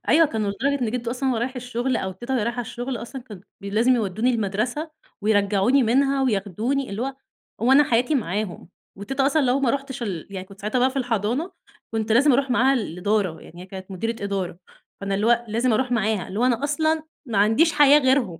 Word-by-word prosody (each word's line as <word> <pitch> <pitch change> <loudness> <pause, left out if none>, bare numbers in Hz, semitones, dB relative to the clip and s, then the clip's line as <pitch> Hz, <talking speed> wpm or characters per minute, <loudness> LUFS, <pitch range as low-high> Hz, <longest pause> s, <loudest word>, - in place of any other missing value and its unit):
أيوه 325 0 +6
كانوا 215 -5 -2
لدرجة 275 +7 -1
إن 220 - 0
جدو 240 -1 -3
أصلًا 260 +2 -1
وهو 245 - +1
رايح 255 +3 -3
الشغل، 250 +1 -2
أو 190 0 -3
تيتا 240 +8 -5
وهي 235 - +1
رايحة 235 +2 -2
الشغل 245 +2 -4
أصلًا، 235 +3 -8
كان 210 -7 -11 0.2
ب - - -14
لازم 225 +6 +2
يودوني 220 +2 0
المَدرسة، 235 +8 -2 0.3
ويرجّعوني 205 +5 +3
منها 270 +4 +2
وياخدوني 225 +3 -1
اللي 205 +4 -3
هو 270 +1 -3 0.5
هو 250 - +4
أنا 290 +2 +7
حياتي 245 +4 +1
معاهم، 205 -6 -3 0.3
وتيتا 270 +6 -1
أصلًا 310 +2 +2
لو 260 +1 +2
ما 260 -4 +2
رُحتش 275 -1 -4
ال 185 -8 -4
يعني 190 -1 -6
كنت 195 +1 -15
ساعتها 215 +5 -1
بقى 260 +1 +3
في 270 - -11
الحضانة 245 - -1 0.4
كنت 220 0 -1
لازم 275 +4 +5
أرُوح 270 +1 +1
معاها 260 +2 +4
الإدارة، 200 -4 -1
يعني 175 +2 -12
هي - - -11
كانت 190 0 -9
مديرة 225 +3 -3
إدارة، 195 -4 -3 0.4
فأنا 195 0 -2
اللي 205 +3 0
هو 240 0 +3
لازم 235 +3 +1
أرُوح 250 +2 0
معاها، 215 -4 0
اللي 195 - -5
هو - - +3
أنا 250 +1 +1
أصلًا 315 +2 +1 0.2
ما 220 -4 -1
عنديش 225 +11 +4
حياة 295 0 +6
غيرهم، 260 - +1
235 Hz, 210 wpm, -23 LUFS, 205-265 Hz, 0.5 s, أنا